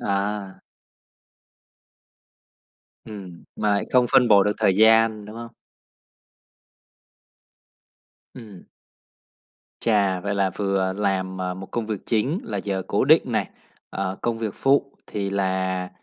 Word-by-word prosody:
À. 100 Hz, -1 st, -3 dB, 2.4 s
Ừm, 95 Hz, -6 st, -10 dB
mà 105 Hz, -, 0 dB
lại 100 Hz, -, +1 dB
không 125 Hz, -1 st, +5 dB
phân 125 Hz, -2 st, +5 dB
bổ 100 Hz, -2 st, +6 dB
được 105 Hz, -, +1 dB
thời 95 Hz, -, +2 dB
gian, 110 Hz, -1 st, +4 dB
đúng 105 Hz, +2 st, -10 dB
không? 115 Hz, 0 st, -9 dB, 2.8 s
Ừm. 105 Hz, -7 st, -12 dB, 1.2 s
Chà. 100 Hz, -5 st, +1 dB
Vậy 100 Hz, +2 st, -2 dB
là 100 Hz, -1 st, +1 dB
vừa 95 Hz, -1 st, -1 dB
làm, 95 Hz, -2 st, -2 dB
à, 90 Hz, 0 st, -2 dB
một 95 Hz, +1 st, -8 dB
công 115 Hz, -2 st, -3 dB
việc 105 Hz, -4 st, -5 dB
chính, 130 Hz, -, 0 dB
là 230 Hz, -, -4 dB
giờ 95 Hz, -2 st, -3 dB
cố -, -, +1 dB
định -, -, +6 dB
này, -, -, -1 dB, 0.4 s
ờ, 95 Hz, 0 st, -3 dB
công 115 Hz, -1 st, -1 dB
việc 110 Hz, -3 st, -3 dB
phụ 140 Hz, 0 st, +1 dB
thì 100 Hz, -1 st, -3 dB
là 95 Hz, -1 st, -1 dB
100 Hz, 125 wpm, -23 LUFS, 95-110 Hz, 2.8 s, bổ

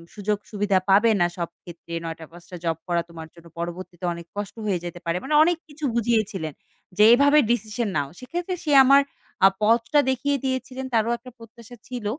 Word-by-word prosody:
সুযোগ-সুবিধা 205 Hz, -1 st, -1 dB
পাবে 210 Hz, +4 st, +5 dB
না -, -, +5 dB
সব 170 Hz, -1 st, -3 dB
ক্ষেত্রে 170 Hz, -1 st, -11 dB
৯টা-৫টা 165 Hz, +2 st, -9 dB
জব 165 Hz, -1 st, 0 dB
করা 170 Hz, -1 st, +1 dB
তোমার 160 Hz, -1 st, -9 dB
জন্য 170 Hz, -1 st, -16 dB
পরবর্তীতে 175 Hz, +1 st, -6 dB
অনেক 170 Hz, 0 st, -9 dB
কষ্ট 205 Hz, +1 st, -5 dB
হয়ে 190 Hz, -4 st, 0 dB
যেতে 175 Hz, 0 st, -7 dB
পারে। 170 Hz, +1 st, 0 dB
মানে 300 Hz, +2 st, 0 dB
অনেক 345 Hz, 0 st, +2 dB
কিছু 295 Hz, 0 st, -6 dB
বুঝিয়েছিলেন। 215 Hz, -9 st, 0 dB, 0.4 s
যে 210 Hz, -, +6 dB
"এভাবে 285 Hz, +4 st, +5 dB
ডিসিশন 220 Hz, -1 st, -1 dB
নাও।" 145 Hz, -1 st, -1 dB
সেক্ষেত্রে 350 Hz, +8 st, -4 dB
সে 295 Hz, -, 0 dB
আমার 275 Hz, +1 st, +7 dB, 0.4 s
আ -, -, +11 dB, 0.2 s
পথটা 230 Hz, +6 st, +3 dB
দেখিয়ে 280 Hz, +2 st, 0 dB
দিয়েছিলেন 260 Hz, 0 st, -3 dB
তারও 225 Hz, +1 st, +2 dB
একটা 250 Hz, +1 st, -13 dB
প্রত্যাশা 230 Hz, +1 st, -14 dB
ছিল। 245 Hz, -4 st, -6 dB
210 Hz, 170 wpm, -24 LUFS, 175-255 Hz, 0.4 s, আ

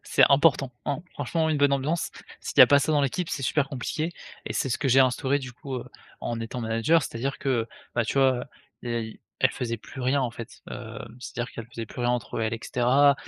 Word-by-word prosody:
c'est -, -, +5 dB
important, 140 Hz, -2 st, +4 dB
hein. 145 Hz, -, -1 dB
Franchement 160 Hz, +4 st, -1 dB
une 155 Hz, -, +1 dB
bonne 140 Hz, -1 st, +4 dB
ambiance, 150 Hz, +5 st, 0 dB, 0.3 s
s'il -, -, -5 dB
y -, -, +10 dB
a -, -, +12 dB
pas 145 Hz, 0 st, +5 dB
ça 155 Hz, -, 0 dB
dans 150 Hz, -2 st, +4 dB
l'équipe, 155 Hz, +5 st, -1 dB
c'est 135 Hz, -, -3 dB
super 140 Hz, +2 st, +1 dB
compliqué 155 Hz, +5 st, -2 dB, 0.3 s
et -, -, -4 dB
c'est -, -, 0 dB
ce 120 Hz, -, -1 dB
que 140 Hz, -, 0 dB
j'ai 130 Hz, +1 st, +5 dB
instauré 130 Hz, +2 st, +2 dB
du 130 Hz, -2 st, -7 dB
coup, 135 Hz, +2 st, -7 dB
heu, 125 Hz, -, -5 dB, 0.4 s
en 115 Hz, -1 st, -3 dB
étant 115 Hz, +2 st, -4 dB
manager. 115 Hz, +8 st, +2 dB
C'est-à-dire 135 Hz, +2 st, -3 dB
que, 140 Hz, -, -3 dB
heu, 115 Hz, -3 st, +1 dB, 0.3 s
bah, 120 Hz, -, +2 dB
tu -, -, -3 dB
vois, 135 Hz, -1 st, +5 dB
heu, -, -, -5 dB, 0.4 s
des 120 Hz, -1 st, -3 dB
a -, -, 0 dB
y 110 Hz, -1 st, -8 dB, 0.2 s
elles -, -, +4 dB
faisaient 115 Hz, -2 st, -3 dB
plus 125 Hz, +4 st, -10 dB
rien 130 Hz, +3 st, +2 dB
en 125 Hz, -3 st, -1 dB
fait, 115 Hz, 0 st, -10 dB
heu, 115 Hz, -2 st, -7 dB, 0.2 s
c'est-à-dire 120 Hz, -1 st, -5 dB
qu'elles 115 Hz, -1 st, -8 dB
faisaient 115 Hz, -1 st, -6 dB
plus 125 Hz, -, -8 dB
rien 120 Hz, 0 st, +2 dB
entre 120 Hz, -1 st, -2 dB
elles 110 Hz, 0 st, 0 dB
et 115 Hz, -, -2 dB
cetera. 135 Hz, +5 st, +4 dB
130 Hz, 250 wpm, -26 LUFS, 120-140 Hz, 0.4 s, a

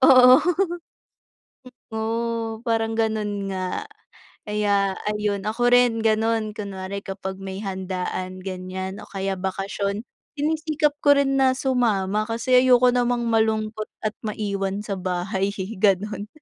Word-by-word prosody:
Oo. 255 Hz, -1 st, +8 dB, 1.5 s
Totoo 225 Hz, 0 st, -2 dB
parang 225 Hz, -2 st, 0 dB
ganun 210 Hz, -3 st, -1 dB
nga. 190 Hz, -, -3 dB, 0.5 s
Kaya 205 Hz, -2 st, +1 dB, 0.2 s
ayun, 210 Hz, -1 st, 0 dB
ako 240 Hz, +3 st, +1 dB
rin 245 Hz, -2 st, +4 dB
ganun, 220 Hz, 0 st, +1 dB
kunwari 200 Hz, -2 st, -5 dB
kapag 190 Hz, -1 st, -6 dB
may 195 Hz, +1 st, -6 dB
handaan, 185 Hz, -1 st, -4 dB
ganyan 185 Hz, 0 st, -5 dB
o -, -, -11 dB
kaya 195 Hz, -1 st, -3 dB
bakasyon, 200 Hz, +2 st, -2 dB, 0.3 s
sinisikap 310 Hz, 0 st, +1 dB
ko 285 Hz, -1 st, +5 dB
rin 275 Hz, -1 st, +2 dB
na 260 Hz, -1 st, +4 dB
sumama 215 Hz, -6 st, +1 dB
kasi 235 Hz, +2 st, +3 dB
ayoko 250 Hz, -1 st, +5 dB
namang 245 Hz, -1 st, +1 dB
malungkot 220 Hz, -1 st, 0 dB, 0.2 s
at 215 Hz, -, 0 dB
maiwan 200 Hz, -2 st, -3 dB
sa 200 Hz, -3 st, -4 dB
bahay 185 Hz, +2 st, -1 dB
eh, 190 Hz, +1 st, -5 dB
ganun, 205 Hz, +1 st, +1 dB
215 Hz, 120 wpm, -23 LUFS, 195-235 Hz, 1.5 s, Oo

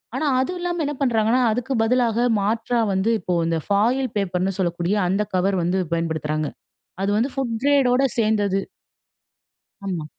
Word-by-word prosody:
ஆனா 310 Hz, -, -1 dB
அதுவும் 355 Hz, +7 st, -2 dB
இல்லாம 350 Hz, -1 st, -2 dB
என்ன 290 Hz, 0 st, -3 dB
பண்றாங்கனா, 230 Hz, -1 st, +2 dB
அதுக்கு 245 Hz, +4 st, -2 dB
பதிலாக 240 Hz, 0 st, +2 dB
மாற்றா 225 Hz, +4 st, 0 dB
வந்து 190 Hz, +4 st, +1 dB
இப்போ 180 Hz, 0 st, -3 dB
இந்த 165 Hz, -1 st, 0 dB
ஃபாயில் 240 Hz, +6 st, +1 dB
பேப்பர்னு 190 Hz, 0 st, -1 dB
சொல்லக்கூடிய 175 Hz, +2 st, 0 dB
அந்த 195 Hz, +3 st, +1 dB
கவர் 190 Hz, +1 st, +1 dB
வந்து 185 Hz, +2 st, 0 dB
பயன்படுத்துறாங்க. 155 Hz, -2 st, -2 dB, 0.5 s
அது 200 Hz, -, 0 dB
வந்து 250 Hz, +4 st, 0 dB
ஃபுட் 250 Hz, -4 st, -2 dB
க்ரேட் 280 Hz, -3 st, +4 dB
ஓட 265 Hz, +2 st, +3 dB, 0.2 s
சேந்தது. 205 Hz, -3 st, +1 dB, 1.3 s
ஆமா. 175 Hz, -5 st, -3 dB
215 Hz, 145 wpm, -22 LUFS, 185-250 Hz, 1.3 s, க்ரேட்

